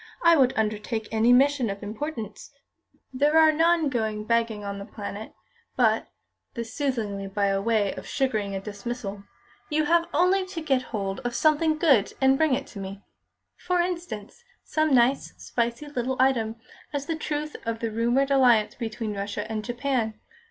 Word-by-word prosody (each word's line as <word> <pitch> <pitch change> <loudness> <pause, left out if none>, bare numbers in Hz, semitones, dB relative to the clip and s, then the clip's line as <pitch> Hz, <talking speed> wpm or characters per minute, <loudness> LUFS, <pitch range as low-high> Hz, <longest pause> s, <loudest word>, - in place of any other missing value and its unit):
"I 335 0 +7
would 265 -4 +4
undertake 215 0 -1
any 225 +2 +3
mission 265 -1 +4
of 200 +1 -5
importance 220 -1 -6 0.3
" - - -40
"There 290 +4 +3
are 315 -1 +7
none 330 0 +3
going 220 -5 -1
begging 230 -2 0
on 200 0 -5
The 200 - -7
Planet. 210 +1 -7 0.4
But" 225 -3 +2 0.5
(this 230 -2 -5
soothingly 220 -9 -2
by 195 0 0
way 210 -2 +1
of - - -9
sugaring 215 -8 -1
a - - -2
dismissal) 205 0 -6 0.4
"you 310 0 +1
have 335 +2 +3
only 365 +4 +3
to 370 -2 -6
get 270 -5 +1
hold 195 -1 -3
of 245 -2 -4
something 310 0 +3
good 275 - +3
and 265 0 +5
bring 300 -2 +3
it 275 +1 -4
to 200 - -7
me. 195 +1 -7 0.5
For 360 0 0
instance, 345 - -4 0.2
some 310 -1 0
nice, 255 +1 +3
spicy 235 +4 -2
little 260 -2 -3
item 235 -4 +2 0.4
as 285 -1 -3
to 325 - -1
the 320 - -6
truth 300 0 -3
of 230 -1 -2
the 225 0 -3
rumoured 240 +5 +1
alliance 245 -6 +4
between 225 -2 -4
Russia 200 +1 -3
and 215 -1 -2
Japan. 240 -2 -2
240 Hz, 170 wpm, -26 LUFS, 215-290 Hz, 0.5 s, I